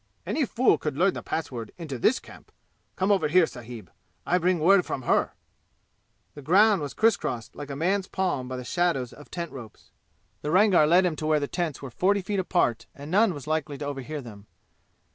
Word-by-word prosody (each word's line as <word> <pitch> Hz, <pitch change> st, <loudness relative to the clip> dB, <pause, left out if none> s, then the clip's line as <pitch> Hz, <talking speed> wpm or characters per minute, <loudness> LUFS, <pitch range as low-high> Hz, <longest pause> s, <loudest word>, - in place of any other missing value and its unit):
"Any 305 Hz, -, 0 dB
fool 250 Hz, +4 st, +2 dB
could 150 Hz, -3 st, -3 dB
learn 185 Hz, +4 st, +3 dB
the -, -, -6 dB
password 120 Hz, -8 st, -5 dB
into 150 Hz, -7 st, -6 dB
this 240 Hz, -, +3 dB
camp! -, -, -15 dB, 0.4 s
Come 190 Hz, +2 st, +1 dB
over 185 Hz, -6 st, +3 dB
here, 175 Hz, +3 st, +5 dB
sahib. 115 Hz, -, -10 dB, 0.3 s
I 180 Hz, -, +2 dB
bring 180 Hz, +1 st, +2 dB
word 180 Hz, +4 st, +5 dB
from 130 Hz, -, -5 dB
her." -, -, +1 dB, 1.0 s
The 145 Hz, -, -10 dB
ground 195 Hz, +6 st, +4 dB
was 145 Hz, -, -5 dB
criss 225 Hz, -1 st, +4 dB
crossed 120 Hz, -, -5 dB
like 145 Hz, 0 st, -8 dB
a 140 Hz, -, -5 dB
man's 190 Hz, +6 st, 0 dB
palm 180 Hz, -9 st, -2 dB
by 130 Hz, 0 st, -5 dB
the 125 Hz, -, -6 dB
shadows 135 Hz, -4 st, -1 dB
of 150 Hz, -, -14 dB
tent 170 Hz, -2 st, -5 dB
ropes. 115 Hz, -5 st, -12 dB, 0.5 s
The 150 Hz, -, -3 dB
Rangar 185 Hz, -3 st, +5 dB
led 180 Hz, +4 st, +5 dB
him 170 Hz, -3 st, 0 dB
to 155 Hz, -, -3 dB
where 155 Hz, -1 st, +3 dB
the 145 Hz, -, -2 dB
tents 165 Hz, -5 st, -3 dB
were 135 Hz, -, -7 dB
forty 195 Hz, +9 st, +1 dB
feet 200 Hz, +1 st, -2 dB
apart 175 Hz, -11 st, 0 dB
and 145 Hz, +2 st, -9 dB
none 205 Hz, +2 st, +4 dB
was 145 Hz, -, -8 dB
likely 155 Hz, -2 st, -2 dB
to 145 Hz, -, -5 dB
overhear 145 Hz, +1 st, -5 dB
them. 105 Hz, -4 st, -12 dB
155 Hz, 205 wpm, -26 LUFS, 135-185 Hz, 1.0 s, here